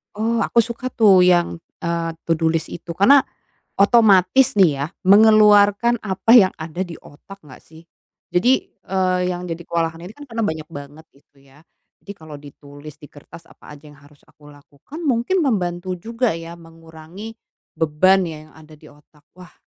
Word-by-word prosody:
Oh 225 +2 -1
aku 235 - +2
suka 235 +2 -7
tuh 195 -5 +4
yang, 175 -1 +1 0.2
eee, 170 -1 -3
to-do 165 0 -1
list 160 -1 -3
itu 170 0 -8
karena, 265 +10 +4 0.5
otomatis 210 +2 +3
nih 190 -6 +4
ya 140 - -3 0.2
mengeluarkan 210 +2 +4
apa 195 +2 -3
yang 210 -6 +6
ada 160 +3 -8
di 170 - -9
otak 195 +7 -16
nggak 130 - -15
sih? 160 +1 -18 0.5
Jadi, 195 +9 +2 0.4
eee, 185 -1 0
yang 180 0 -5
jadi 170 -1 -6
kewalahan 165 -1 -3
ini 180 +5 -11
kan 290 - -11
karena 230 -4 -6
banyak 160 -4 -4
banget 145 +3 -11
itu 140 0 -28
ya. 140 +2 -22 0.4
Jadi 200 - -10
kalau 155 -2 -12
ditulis 145 +1 -14
di - - -17
kertas 150 +3 -15
apa - - -17
aja 145 - -22
yang 145 - -18
harus 145 0 -22
aku 150 -1 -21
lakukan 145 - -14
mungkin 265 +8 0
membantu 185 -6 -2
juga 230 +2 -2
ya 165 0 -9
mengurangi 165 +5 -13 0.4
beban 185 +5 +2
ya 155 -2 -9
yang - - -23
ada 155 0 -17
di 155 - -18
otak. 150 +1 -24
Wah, 180 -1 -15
175 Hz, 170 wpm, -19 LUFS, 155-210 Hz, 0.5 s, yang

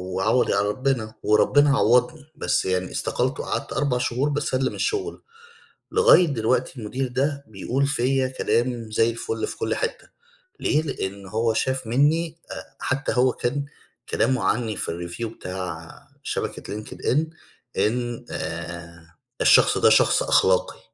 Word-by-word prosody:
وعوضي 105 +6 +2
على 100 +1 +1
ربِّنا 120 -1 -1
وربِّنا 140 +6 +4
عوَّضني، 125 +6 +2
بس - - 0
يعني 95 0 -1
استقلت - - -1
وقعدت - - -3
4 135 -2 0
شهور 125 +3 0
باسلِّم 135 -3 -1
الشُغل. 420 -1 -2 0.7
لغاية 450 - +6
دلوقتي 125 -1 -1
المدير 125 +5 -3
ده 140 +3 -1
بيقول 120 +7 -1
فيّا 135 -1 +1
كلام 120 -2 -1
زي 115 +2 +3
الفُل 115 -1 -3
في - - -7
كل - - -1
حتّة 460 -1 -4 0.5
ليه؟ 155 0 +2
لإن 100 -9 -5
هو 110 +3 0
شاف 130 +2 -1
منّي 155 +7 +1
آآ - - -6 0.2
حتّى 135 +2 -1
هو 125 0 +3
كان 140 +5 -2 0.4
كلامه 130 +2 +1
عنّي 115 -3 0
في - - -4
الreview 85 +7 -5
بتاع 90 -3 -6 0.3
شبكة 105 - -4
linked - - -12 0.2
in 135 - +3 0.6
إن 120 +2 -1
آآ 85 0 -7 0.3
"الشخص - - +5
ده - - +5
شخص - - +4
أخلاقي، 95 -1 +2
125 Hz, 140 wpm, -24 LUFS, 105-135 Hz, 0.7 s, لغاية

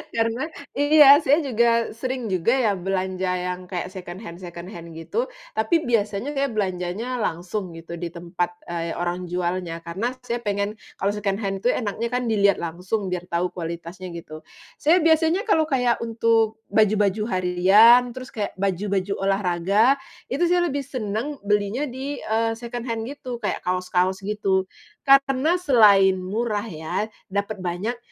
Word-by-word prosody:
karena 230 +5 0 0.3
iya 290 0 +7
saya 295 +2 +3
juga 235 -2 +2
sering 255 +2 -4
juga 205 +5 +1
ya 220 -5 +2
belanja 185 0 -2
yang 180 0 -3
kayak 180 0 -4
second 180 -2 -8
hand 170 -3 -9
second 175 -1 -8
hand 170 -4 -10
gitu, 460 - -2 0.2
tapi 220 +10 +1
biasanya 225 +3 0
saya 280 -1 0
belanjanya 210 +3 -2
langsung 180 +2 -3
gitu 165 +1 -8
di 175 - -3
tempat, 175 +1 -3 0.2
eee, 170 -1 -4
orang 175 +1 -3
jualnya 175 -1 -2
karena 185 +7 -2 0.2
saya 240 0 -2
pengen 205 -1 -1 0.2
kalau 200 - 0
second 200 -2 -1
hand 195 -2 -3
tuh 245 - +2
enaknya 225 -1 -1
kan 250 0 -1
dilihat 200 -4 +3
langsung 180 +4 -3
biar 180 0 -5
tahu 175 +1 -1
kualitasnya 170 +2 -6
gitu. 165 -2 -9 0.4
Saya 320 +4 +5
biasanya 325 +5 +3
kalau 315 -7 +2
kayak 250 -4 +1
untuk 225 -1 +1
baju-baju 210 -1 +3
harian, 195 +7 +5
terus 255 +1 -9
kayak 210 -3 -4
baju-baju 195 0 -1
olahraga, 195 +6 +2 0.3
itu 350 0 +2
saya 350 0 +3
lebih 285 -4 -1
seneng 255 +1 -4
belinya 210 +6 +1
di 270 +2 -5
eee, 225 +1 0
second 240 +1 -6
hand 225 -1 -2
gitu 255 -2 -6
kayak - - -3
kaos-kaos 185 +1 0
gitu, 195 -2 0 0.4
karena 275 +4 +4
selain 205 - +6
murah 210 +2 -2
ya, 160 +5 -3 0.2
dapet 200 +2 -2
banyak, 185 +7 -2
210 Hz, 150 wpm, -23 LUFS, 180-240 Hz, 0.4 s, iya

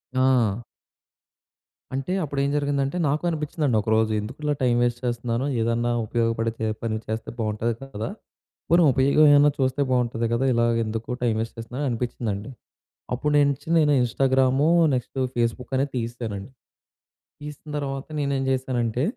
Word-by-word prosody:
ఆ! 120 -4 +2 1.3
అంటే 135 +6 -3
అప్పుడు 140 -2 -3
ఏం 140 - +1
జరిగిందంటే, 140 +1 0
నాకు 150 +4 0
అనిపిచ్చిందండి 150 -6 -1
ఒకరోజు. 110 +1 +2
ఎందుకు 115 +6 -7
ఇలా 150 0 +1
టైం 120 -1 +3
వేస్ట్ 120 0 0
చేస్తన్నాను, 120 +1 -1 0.2
ఏదన్నా 115 +1 0
ఉపయోగపడే 115 -1 -1
పని 110 -1 -1
చేస్తే 110 +1 -4
బావుంటది 110 +1 -1
కదా, 110 -3 -5 0.6
పోనీ 170 +1 +5
ఉపయోగం 140 +3 +4
ఏవైనా 145 +1 +6
చూస్తే 130 +2 +1
బావుంటది 120 -2 +1
కద, 120 - 0
ఇలాగ 115 0 +2
ఎందుకు 110 +2 -5
టైం 115 -2 +2
వేస్ట్ 115 - -5
చేస్తున్నాను 125 +5 -4
అనిపిచ్చిందండి. 115 -2 -3 0.6
అప్పుడు 150 +4 -1
నేనించి 140 0 +1
నేను 150 -2 +4
ఇన్‌స్టాగ్రామూ 130 +3 +2 0.3
నెక్స్ట్ 125 +2 -5 0.2
ఫేస్‌బుక్ 120 +2 -1
అనేది 140 +1 0
తీసేశానండి. 115 -2 -5 0.9
తీసిన 150 +1 -9
తర్వాత 135 -1 -4
నేనేం 140 -2 0
చేశానంటే 125 -2 -1
125 Hz, 135 wpm, -24 LUFS, 115-140 Hz, 1.3 s, ఏవైనా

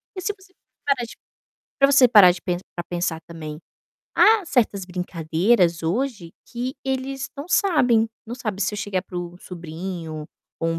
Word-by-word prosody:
E, 370 - -5
se 415 - 0
você 380 -1 -21 0.3
parar 275 -4 +1
de 230 - -12 0.6
pra 275 0 +5
você 270 -3 +7
parar 205 -6 +8
de 175 0 -2
pen 175 -1 -1 0.2
pra 175 - -4
pensar 175 -2 -2
também, 155 -2 -8 0.5
há 435 -2 +6
certas 215 -8 +1
brincadeiras 180 +1 +1
hoje 190 -1 -2
que 250 +4 -4
eles 265 0 -2
não 285 +4 -7
sabem, 250 - +3 0.2
não 235 - -5
sabe. 215 -5 -3
Se 210 +2 -1
eu - - -4
chegar 190 -3 -2
para 180 - -6
o 175 0 -6
sobrinho, 165 -2 -6 0.4
ou 165 - +1
um 165 0 -1
195 Hz, 175 wpm, -23 LUFS, 170-260 Hz, 0.6 s, parar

